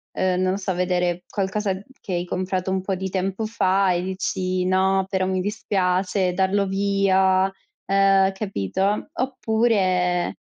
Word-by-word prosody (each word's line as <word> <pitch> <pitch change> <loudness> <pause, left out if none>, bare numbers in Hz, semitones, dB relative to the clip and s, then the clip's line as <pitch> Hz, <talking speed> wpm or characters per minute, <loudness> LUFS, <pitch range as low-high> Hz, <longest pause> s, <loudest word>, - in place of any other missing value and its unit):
ehm, 185 -1 +1
non 185 0 +2
lo 195 - -1
so, 190 -2 -3
vedere 180 -1 0
qualcosa 195 0 -1 0.3
che 185 - -6
hai 175 0 -1
comprato 185 +1 -2
un 190 0 0
po' 195 - -2
di 190 +1 -3
tempo 195 +3 -2
fa 195 -3 +2
e 175 +1 -1
dici: 185 -1 -2
"No, 190 +1 +2
però 190 -1 0
mi 185 0 0
dispiace 185 -2 0
darlo 195 +2 +1
via", 195 -1 +2 0.3
ehm, 195 0 +4
capito? 195 - -2
Oppure, 210 -8 +1
190 Hz, 145 wpm, -23 LUFS, 185-195 Hz, 0.3 s, ehm